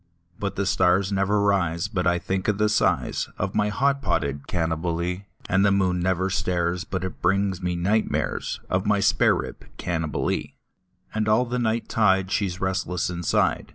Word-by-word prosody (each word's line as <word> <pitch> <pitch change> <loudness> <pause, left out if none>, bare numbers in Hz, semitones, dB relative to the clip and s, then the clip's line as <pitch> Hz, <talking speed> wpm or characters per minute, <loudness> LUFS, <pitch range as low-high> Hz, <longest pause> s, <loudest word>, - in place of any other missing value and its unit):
But 100 -1 -3
the 100 - -1
stars 95 +1 +2
never 100 +1 +1
rise 90 -4 +1
but 95 -3 -1
I 85 0 +3
think 95 +2 -2
of 105 -2 +1
the 105 0 +2
size 105 - +1
Of 95 +1 -2
my 105 -1 +1
hot 140 +6 +1
potted 75 - -1
Cannibalee, 85 +2 -2 0.2
And 95 +1 +3
the 100 - +4
moon 95 -2 +2
never 95 +1 0
stares 90 -1 0
but 95 -1 -4
it 95 - -6
brings 95 +1 +1
me 90 -1 -1
night 100 +6 +1
mares - - -2
Of 95 +2 -1
my 105 -1 +3
spare - - +4
rib - - -6
Cannibalee; 80 -4 -2 0.6
And 110 0 -1
all 110 +4 +4
the 125 +1 -2
night 115 -1 0
tide 95 -3 +2
she 100 - +1
is 90 +1 -6
restless 95 -2 -1
inside. 85 -2 0
95 Hz, 180 wpm, -24 LUFS, 90-100 Hz, 0.6 s, the